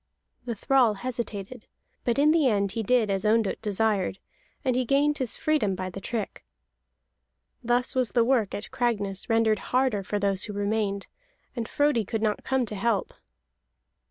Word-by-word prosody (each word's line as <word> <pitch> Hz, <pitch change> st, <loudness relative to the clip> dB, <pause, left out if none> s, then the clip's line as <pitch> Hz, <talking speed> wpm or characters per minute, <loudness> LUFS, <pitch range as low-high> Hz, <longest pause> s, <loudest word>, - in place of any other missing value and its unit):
The 235 Hz, -2 st, -3 dB
thrall 245 Hz, -1 st, +3 dB
hesitated, 235 Hz, -1 st, -5 dB, 0.4 s
but 240 Hz, 0 st, +1 dB
in 295 Hz, +2 st, +5 dB
the 315 Hz, -4 st, +3 dB
end 200 Hz, -4 st, +1 dB
he 225 Hz, -, -2 dB
did 220 Hz, -1 st, +2 dB
as 195 Hz, -1 st, -1 dB
Ondott 220 Hz, -1 st, +1 dB
desired, 205 Hz, -2 st, 0 dB, 0.5 s
and 255 Hz, -2 st, +2 dB
he 255 Hz, -, +2 dB
gained 285 Hz, +4 st, +2 dB
his 250 Hz, -5 st, -1 dB
freedom 290 Hz, -11 st, +1 dB
by 185 Hz, 0 st, -4 dB
the 195 Hz, -, -8 dB
trick. 220 Hz, 0 st, -4 dB, 1.2 s
Thus 245 Hz, +1 st, +1 dB
was 255 Hz, -5 st, +1 dB
the 235 Hz, -, +4 dB
work 235 Hz, -4 st, +1 dB
at 205 Hz, -, -6 dB
Cragness 205 Hz, -6 st, -1 dB
rendered 225 Hz, -1 st, +3 dB
harder 255 Hz, -5 st, +2 dB
for 205 Hz, +2 st, -3 dB
those 195 Hz, -2 st, 0 dB
who 210 Hz, -, -6 dB
remained, 200 Hz, -1 st, -1 dB, 0.5 s
and 235 Hz, -2 st, -4 dB
Frodi 290 Hz, -6 st, +2 dB
could 220 Hz, +2 st, -3 dB
not 210 Hz, -1 st, 0 dB
come 265 Hz, -2 st, +1 dB
to 215 Hz, -, -7 dB
help. 205 Hz, 0 st, 0 dB
225 Hz, 165 wpm, -26 LUFS, 200-250 Hz, 1.2 s, in